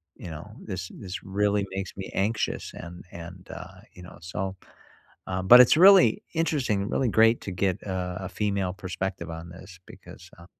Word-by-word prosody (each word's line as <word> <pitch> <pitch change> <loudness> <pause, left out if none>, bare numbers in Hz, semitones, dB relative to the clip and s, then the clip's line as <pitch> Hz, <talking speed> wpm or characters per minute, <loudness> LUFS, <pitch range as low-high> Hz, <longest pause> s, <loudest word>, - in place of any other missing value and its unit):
you 90 - -9
know? 80 -1 -9
"This 95 0 -5
this 95 -1 -7
really 100 +1 0
makes 95 0 -4
me 95 - -6
anxious," 110 +3 -1
and 85 +1 -9
and, 85 +2 -10
uh, - - -10
you 90 - -13
know? 90 - -12
So, 95 +2 -4 0.7
uh, 95 0 -2
but 120 +7 +9
it's 125 +4 +7
really 195 +2 +7
interesting, 130 -11 0
really 130 - +1
great 115 +2 +4
to - - -5
get, 95 +2 -1
uh, 90 -2 -3
a 95 - -5
female 100 -2 -1
perspective 95 -2 -5
on 80 +1 -7
this 90 +1 -12
because, 85 +1 -14
uh 85 - -14
95 Hz, 175 wpm, -26 LUFS, 90-105 Hz, 0.7 s, but